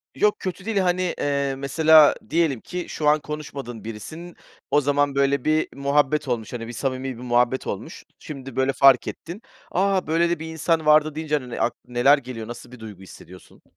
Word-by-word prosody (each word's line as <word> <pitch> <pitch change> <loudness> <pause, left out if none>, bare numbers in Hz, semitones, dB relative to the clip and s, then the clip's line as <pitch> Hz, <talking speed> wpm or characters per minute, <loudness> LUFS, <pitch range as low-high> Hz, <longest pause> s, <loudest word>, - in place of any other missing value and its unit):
Yok 210 0 +2
kötü 185 +1 -5
değil, 225 -3 -2
hani, 180 -1 +1
eee, 140 -1 -1
mesela 155 +2 +5
diyelim 160 -8 +1
ki, 180 -1 -5
şu 150 - -2
an 150 +1 +4
konuşmadığın 140 -6 -7
birisin, 155 - -8 0.4
o 145 - +4
zaman 145 0 +1
böyle 140 -1 +1
bir 155 0 +2
muhabbet 140 +1 +1
olmuş, 120 -2 -3
hani, 115 -1 -5
bir 120 - -7
samimi 130 0 -3
bir 125 - -10
muhabbet 125 +1 +1
olmuş. - - -6 0.2
Şimdi, 135 -3 -9
böyle, 130 +1 +1
fark 135 -2 +5
ettin. 180 +7 -7 0.3
"A, 190 -1 +1
böyle 170 +2 +2
de 170 - -1
bir 160 - -6
insan 160 0 -1
vardı" 155 0 +4
deyince, 155 -1 -1
hani, 125 -3 -8
n - - -5
ak - - +1
neler 125 +4 +4
geliyor, 120 -4 -8
nasıl 120 +1 -10
bir 125 - -12
duygu 105 -4 -10
hissediyorsun? 90 -1 -15
140 Hz, 190 wpm, -23 LUFS, 125-160 Hz, 0.4 s, mesela